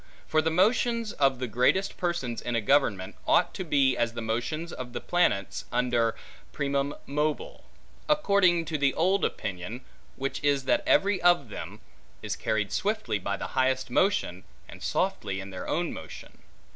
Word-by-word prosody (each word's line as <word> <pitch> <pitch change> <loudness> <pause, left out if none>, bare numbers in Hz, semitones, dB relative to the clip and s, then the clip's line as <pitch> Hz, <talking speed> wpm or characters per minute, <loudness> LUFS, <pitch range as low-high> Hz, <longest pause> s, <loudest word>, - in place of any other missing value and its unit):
For 155 - +2
the 160 - +1
motions 225 +5 +2
of 135 -2 +2
the 125 - -3
greatest 125 - +1
persons 170 -10 -2
in 120 -1 -2
a - - +3
government, 105 -6 +2
ought - - +3
to 185 - -4
be 140 -5 +3
as 120 -1 0
the 115 - -5
motions 120 +9 -3
of 125 -1 -7
the - - -3
planets 135 - 0
under 120 -2 +1 0.4
primum 140 0 -1
mobile; 150 +2 -2 0.4
according 200 - +3
to 155 -2 -3
the 140 -1 +2
old 185 +4 +2
opinion: 105 +4 -3 0.3
which 135 +2 -4
is, 140 -2 +2
that - - +3
every 200 -1 +3
of 175 -8 +4
them, - - -8 0.4
is - - -2
carried 105 -2 -1
swiftly 210 - -1
by 100 +2 -2
the - - -5
highest 130 -1 +1
motion, 155 - +1 0.2
and - - -12
softly 95 -2 -1
in 100 0 -7
their 90 -1 -6
own 170 +1 -1
motion. 80 - -10
140 Hz, 165 wpm, -28 LUFS, 115-175 Hz, 0.4 s, of